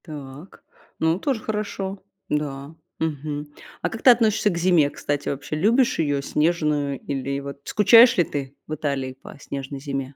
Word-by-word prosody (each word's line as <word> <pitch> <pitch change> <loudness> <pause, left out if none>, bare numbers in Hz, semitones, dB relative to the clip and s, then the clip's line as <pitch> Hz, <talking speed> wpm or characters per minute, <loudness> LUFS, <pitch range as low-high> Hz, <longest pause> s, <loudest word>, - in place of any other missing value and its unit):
Так, 145 +1 -10 0.4
ну, 160 +2 +2
тоже 260 -2 -1
хорошо, 200 -3 -4 0.3
да, 145 0 -3 0.3
мгм. 150 -1 -3 0.3
А - - 0
как 225 - -7
ты - - +7
относишься 220 -3 +4
к 175 - -3
зиме, 170 -4 +4
кстати, 145 0 -3
вообще? 140 +2 -4
Любишь 230 - +2
её 145 -3 +1
снежную 150 -3 0
или, 140 0 -3
вот, 140 0 -8
скучаешь 230 +3 +6
ли 175 - +5
ты 140 -3 -5
в 155 - -4
Италии 140 -3 -2
по - - -11
снежной 140 0 -6
зиме? 135 -1 -5
150 Hz, 160 wpm, -23 LUFS, 140-190 Hz, 0.4 s, ты